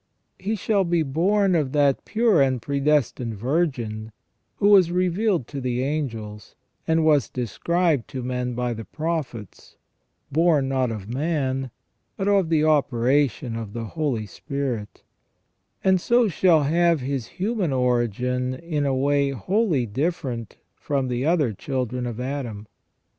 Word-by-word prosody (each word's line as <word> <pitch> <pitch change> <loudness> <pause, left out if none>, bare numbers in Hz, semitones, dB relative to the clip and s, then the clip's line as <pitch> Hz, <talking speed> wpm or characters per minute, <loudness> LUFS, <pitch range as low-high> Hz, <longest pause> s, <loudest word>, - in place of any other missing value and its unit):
He 205 +4 -1
shall 205 -1 +1
be 170 -2 +1
born 185 +7 +2
of 150 -6 0
that 145 -2 +2
pure 220 -8 +3
and 130 -2 +2
pre 140 +4 -2
destined 135 -5 +1
Virgin 120 - -2 0.4
who 205 - +3
was 190 -4 +6
revealed 180 - +1
to 140 -2 -5
the 125 0 -1
angels, 115 -8 -4 0.3
and 160 0 +2
was 145 -8 +3
described 150 - 0
to 130 -3 -6
men 125 -1 -2
by 125 0 -1
the 115 0 -7
prophets, 155 - -5 0.6
born 155 -2 +3
not 130 -2 0
of 105 -4 -6
man, 135 0 -1 0.5
but 195 - -2
of 195 -4 +3
the 155 -2 +3
operation 135 -3 +2
of 110 -3 -6
the 115 -1 -4
Holy 140 -9 -1
Spirit; 130 -3 -5 0.8
and 190 -1 +3
so 240 +2 +3
shall 170 -4 +3
have 165 +1 +2
His 130 -2 -3
human 200 -4 0
origin 125 0 0
in 150 -1 -2
a 135 - +1
way 140 +1 +2
wholly 155 - 0
different 130 - -3 0.2
from 135 -3 -2
the 125 +3 -1
other 155 -9 +2
children 125 +1 -3
of 120 -1 -5
Adam. 125 -5 -4
140 Hz, 140 wpm, -24 LUFS, 125-165 Hz, 0.8 s, was